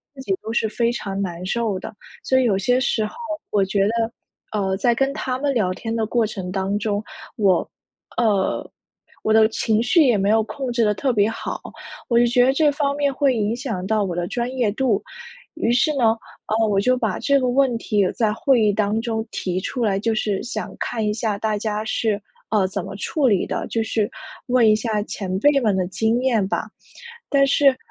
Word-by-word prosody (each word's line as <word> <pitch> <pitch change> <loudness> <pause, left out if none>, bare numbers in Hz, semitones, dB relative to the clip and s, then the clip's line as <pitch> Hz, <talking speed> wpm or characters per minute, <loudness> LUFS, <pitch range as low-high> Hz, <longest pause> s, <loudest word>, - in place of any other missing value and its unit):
自 265 - -9
己 195 -7 -1
都 220 - -5
是 225 - +1
非 235 +2 0
常 200 -5 -4
难 175 -2 -4
受 215 -1 -1
的。 - - -8 0.3
所 260 0 +3
以 - - +3
有 210 -5 +3
些 245 +6 +2
时 225 -4 0
候， 210 - -7 0.4
我 205 -2 +3
觉 195 +1 +1
得， 225 +2 0 0.5
呃， 190 -1 0
在 240 +3 +2
跟 270 +2 +1
他 255 -3 -2
们 285 -1 0
聊 200 -6 +1
天 225 +4 -4
的 225 -1 0
过 235 0 +1
程 190 -4 -5
当 195 +1 -1
中， 205 0 -1 0.3
我 195 -5 +2 0.5
呃， 210 -5 +1 0.6
我 215 - +2
的 220 0 +6
情 220 -1 +1
绪 320 +6 +4
也 240 -4 +4
没 195 +1 +1
有 220 +1 +4
控 260 +3 -5
制 235 -1 +2
得 210 - +2
特 255 +6 0
别 210 -2 +2
好， 225 - -5 0.5
我 235 -2 +2
就 240 - +5
觉 245 +1 +4
着 265 - +3
这 295 +1 +3
方 285 -1 -1
面， 285 -1 0
会 270 -1 +2
影 215 -1 0
响 235 -8 -4
到 215 +1 +1
我 180 -3 -3
的 175 0 -1
专 240 +4 -2
业 240 -5 +1
度。 225 -2 0 0.5
于 235 -7 0
是 245 +6 +3
呢， 225 -3 +3 0.3
呃， 220 +1 +2
我 200 -2 +2
就 255 +5 +2
把 - - -1
这 280 -1 +3
个 255 - 0
问 255 -1 +2
题 205 -4 +1
在 220 -3 +1
会 250 +2 +2
议 210 - +4
当 210 +1 0
中 225 -1 -2
提 185 0 -2
出 245 +5 -3
来， 195 -3 +1
就 225 +2 0
是 205 -2 -1
想 - - -5
看 225 -2 -2
一 210 - +1
下 215 -2 -1
大 215 0 -1
家 210 0 -2
是， 220 -1 -1 0.3
呃， 210 -3 +3
怎 195 -1 -4
么 195 0 -7
处 275 +7 0
理 200 -6 +2
的， - - -3
就 225 - -1
是 220 -1 -1 0.4
问 245 -2 +4
一 215 - +6
下 215 -1 -1
前 190 -3 -4
辈 290 +4 +4
们 215 -6 +1
的 185 -1 0
经 225 +5 0
验 235 -7 +2
吧。 - - -2 0.6
但 275 -1 +4
是， 275 -1 +4
220 Hz, 235 characters per minute, -22 LUFS, 205-245 Hz, 0.6 s, 的